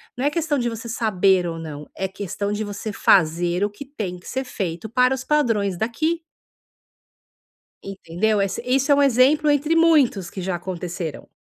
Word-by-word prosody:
Não 250 Hz, -, -4 dB
é -, -, +4 dB
questão 310 Hz, -1 st, -1 dB
de 240 Hz, -, 0 dB
você 230 Hz, +1 st, -7 dB
saber 195 Hz, -5 st, +2 dB
ou 165 Hz, -1 st, -4 dB
não, 150 Hz, -2 st, -8 dB
é 190 Hz, -, -2 dB
questão 200 Hz, +1 st, -4 dB
de 210 Hz, +1 st, -2 dB
você 205 Hz, +1 st, -5 dB
fazer 175 Hz, 0 st, +3 dB
o 205 Hz, -, +1 dB
que 205 Hz, +7 st, -10 dB
tem 210 Hz, -10 st, -5 dB
que -, -, -16 dB
ser 265 Hz, +1 st, -2 dB
feito 190 Hz, -5 st, -5 dB
para 250 Hz, +3 st, +3 dB
os 260 Hz, -, -7 dB
padrões 225 Hz, -11 st, +1 dB
daqui. 310 Hz, -, -1 dB, 1.6 s
Entendeu? 195 Hz, +2 st, -1 dB
Ess 195 Hz, -1 st, -1 dB
isso 265 Hz, +3 st, +1 dB
é -, -, +7 dB
um 285 Hz, -, +3 dB
exemplo 280 Hz, +4 st, +4 dB
entre 295 Hz, +3 st, +1 dB
muitos 295 Hz, -, +3 dB
que 190 Hz, -, -7 dB
já 185 Hz, 0 st, -2 dB
aconteceram. 175 Hz, -2 st, -5 dB
210 Hz, 180 wpm, -22 LUFS, 185-265 Hz, 1.6 s, é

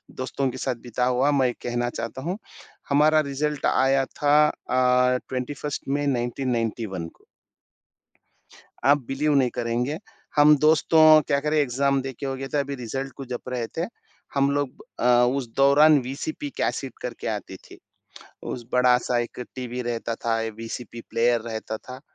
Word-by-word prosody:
दोस्तों 130 Hz, +1 st, -2 dB
के 130 Hz, -, -7 dB
साथ 130 Hz, -1 st, -2 dB
बिता 125 Hz, +1 st, -1 dB
हुआ 130 Hz, +3 st, +2 dB
मैं 135 Hz, -3 st, +3 dB
एक 120 Hz, -, -4 dB
कहना 120 Hz, 0 st, -1 dB
चाहता 120 Hz, +2 st, -5 dB
हूँ। 175 Hz, +7 st, -3 dB, 0.5 s
हमारा 150 Hz, +2 st, +4 dB
रिजल्ट 150 Hz, +1 st, -2 dB
आया 135 Hz, +1 st, +3 dB
था 145 Hz, +2 st, +1 dB
अ, 125 Hz, -2 st, +2 dB
21st 140 Hz, +3 st, -4 dB
मे 145 Hz, +1 st, 0 dB
1991 120 Hz, -7 st, -2 dB
को। -, -, -20 dB, 1.6 s
आप 140 Hz, -1 st, +4 dB
बिलीव 145 Hz, +3 st, 0 dB
नहीं 130 Hz, -3 st, +3 dB
करेंगे। 120 Hz, +5 st, -1 dB, 0.4 s
हम 150 Hz, 0 st, +7 dB
दोस्तों 155 Hz, 0 st, +6 dB
क्या 140 Hz, -2 st, +2 dB
करें 150 Hz, +2 st, 0 dB
एग्ज़ाम 140 Hz, 0 st, +1 dB
देके 135 Hz, +1 st, -6 dB
हो 135 Hz, -1 st, -2 dB
गया 135 Hz, +1 st, -5 dB
था 145 Hz, -, +2 dB
अभी 140 Hz, 0 st, -2 dB
रिजल्ट 135 Hz, +2 st, -5 dB
को 135 Hz, -, -6 dB
जप 125 Hz, 0 st, -6 dB
रहे 125 Hz, -2 st, -2 dB
थे। 170 Hz, -, 0 dB, 0.5 s
हम 140 Hz, 0 st, +3 dB
लोग 145 Hz, -1 st, 0 dB, 0.3 s
अ, -, -, -1 dB, 0.3 s
उस 135 Hz, -3 st, -2 dB
दौरान 145 Hz, +2 st, +6 dB
वीसीपी 140 Hz, +3 st, -5 dB
कैसेट -, -, -2 dB
करके -, -, -5 dB
आती -, -, -4 dB
थी। -, -, -16 dB, 0.7 s
उस 120 Hz, -, -5 dB
बड़ा-सा 125 Hz, -1 st, +3 dB
एक 120 Hz, -, -6 dB
टीवी 125 Hz, -1 st, -4 dB
रहता 120 Hz, -1 st, -3 dB
था, 115 Hz, 0 st, -1 dB, 0.2 s
वीसीपी 115 Hz, +1 st, -7 dB
प्लेयर 120 Hz, 0 st, +2 dB
रहता 110 Hz, -1 st, -5 dB
था। 125 Hz, +3 st, -10 dB
130 Hz, 155 wpm, -24 LUFS, 120-140 Hz, 1.6 s, हम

